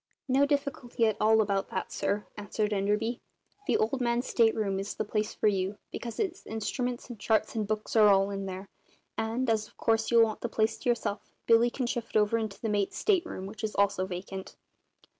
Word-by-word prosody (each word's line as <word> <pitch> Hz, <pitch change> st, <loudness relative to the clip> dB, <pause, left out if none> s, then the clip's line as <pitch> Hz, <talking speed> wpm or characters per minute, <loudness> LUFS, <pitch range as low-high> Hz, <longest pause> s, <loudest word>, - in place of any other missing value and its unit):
"No 275 Hz, +2 st, +4 dB
difficulty 280 Hz, -5 st, 0 dB
at 220 Hz, -2 st, +2 dB
all 220 Hz, +1 st, +5 dB
about 200 Hz, -2 st, 0 dB
that, -, -, -4 dB
sir," 205 Hz, +1 st, -1 dB
answered 210 Hz, +1 st, -2 dB
Enderby. 210 Hz, +4 st, 0 dB, 0.5 s
"The -, -, +3 dB
Old 245 Hz, +5 st, 0 dB
Man's 240 Hz, +1 st, +1 dB
state 225 Hz, -2 st, +3 dB
room 195 Hz, -3 st, -1 dB
is 195 Hz, +1 st, -4 dB
the -, -, -2 dB
place 210 Hz, 0 st, -2 dB
for -, -, +1 dB
you, 195 Hz, 0 st, 0 dB
because 235 Hz, -1 st, -6 dB
his 380 Hz, -5 st, -2 dB
instruments 240 Hz, +3 st, -3 dB
and 240 Hz, -4 st, -9 dB
charts 220 Hz, 0 st, +1 dB
and 215 Hz, -2 st, -1 dB
books 215 Hz, +1 st, -3 dB
are 215 Hz, -2 st, +7 dB
all 195 Hz, 0 st, +4 dB
in 195 Hz, 0 st, -4 dB
there; 190 Hz, +1 st, -6 dB, 0.5 s
and, 230 Hz, +4 st, -1 dB
as 220 Hz, -2 st, +1 dB
of -, -, -25 dB
course 225 Hz, -1 st, +1 dB
you'll 235 Hz, -1 st, +6 dB
want 220 Hz, -1 st, -1 dB
the 235 Hz, -, -2 dB
place 220 Hz, -1 st, 0 dB
to -, -, -1 dB
yourself, 225 Hz, -3 st, -1 dB
Billy 230 Hz, +1 st, +5 dB
can 255 Hz, +1 st, -3 dB
shift 235 Hz, -2 st, -2 dB
over 215 Hz, +2 st, +3 dB
into 215 Hz, -3 st, -4 dB
the 225 Hz, -, -3 dB
mate's 205 Hz, -2 st, 0 dB
state 380 Hz, -5 st, +2 dB
room, 185 Hz, -, -6 dB
which 215 Hz, +3 st, -9 dB
is 215 Hz, -, -2 dB
also 200 Hz, -2 st, +2 dB
vacant." 190 Hz, +1 st, -6 dB
220 Hz, 210 wpm, -29 LUFS, 200-235 Hz, 0.5 s, are